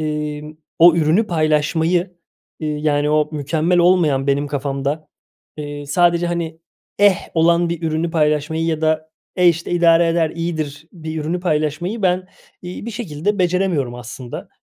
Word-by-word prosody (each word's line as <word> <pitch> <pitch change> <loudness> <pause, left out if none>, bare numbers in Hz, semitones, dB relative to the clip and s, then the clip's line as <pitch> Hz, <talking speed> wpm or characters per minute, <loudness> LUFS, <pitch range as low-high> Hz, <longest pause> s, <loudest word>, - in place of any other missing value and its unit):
ııı, 150 -1 -3 0.4
o 170 0 +8
ürünü 165 +8 +2
paylaşmayı, 165 +2 +1 0.5
ııı, 155 - -1
yani, 150 0 0
o 150 0 +2
mükemmel 155 +4 0
olmayan 165 -6 +3
benim 140 +1 +1
kafamda, 140 +2 -3 0.5
ııı, 145 -1 -6
sadece, 175 +2 +2
hani, 165 -2 -3 0.4
eh, 205 -3 +5 0.2
olan 170 +1 +3
bir 170 0 -4
ürünü 160 +1 -1
paylaşmayı 155 0 0
ya 160 -1 -1
da, 155 0 0 0.3
eh 180 -1 +5
işte, 165 0 0
idare 170 -1 +4
eder, 165 -1 +1
iyidir 155 -3 -4
bir 160 -2 -6
ürünü 170 +4 -2
paylaşmayı 175 +5 -1
ben, 185 0 +1 0.3
iii, 180 +5 -7
bir - - -3
şekilde 205 -2 -3
beceremiyorum 175 -8 0
aslında. 120 +1 -8
160 Hz, 145 wpm, -19 LUFS, 150-175 Hz, 0.5 s, o